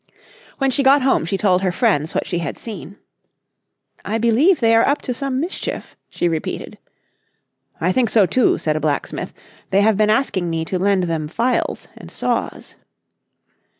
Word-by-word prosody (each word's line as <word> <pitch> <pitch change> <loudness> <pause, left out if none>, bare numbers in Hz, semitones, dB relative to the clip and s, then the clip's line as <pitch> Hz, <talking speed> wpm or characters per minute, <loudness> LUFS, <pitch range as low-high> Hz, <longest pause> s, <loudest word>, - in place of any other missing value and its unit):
When 270 -1 +1
she 280 - +1
got 275 0 +5
home 265 -10 +2
she 195 +4 -1
told 185 -2 +2
her 185 -2 +1
friends 150 -2 0
what - - 0
she 175 - -2
had 165 -5 -4
seen. 200 - -9 1.1
"I 220 - -2
believe 240 - +3
they 230 -1 +3
are 225 - +4
up 285 - 0
to 250 - -2
some 265 +1 -3
mischief," 340 +6 -5
she 175 - -1
repeated. 160 -2 -4 1.0
"I 175 +3 +1
think 240 +3 +1
so 215 -4 +4
too," 250 +6 +2
said 155 -1 -1
a - - 0
blacksmith, 150 -1 -2 0.4
"they 195 - +3
have 215 -1 +3
been 215 0 +3
asking 215 -7 +1
me 165 -1 -2
to 185 +2 -2
lend 195 0 +2
them 165 -3 -2
files 235 +10 -1
and - - -12
saws." - - -3
205 Hz, 175 wpm, -20 LUFS, 170-250 Hz, 1.1 s, got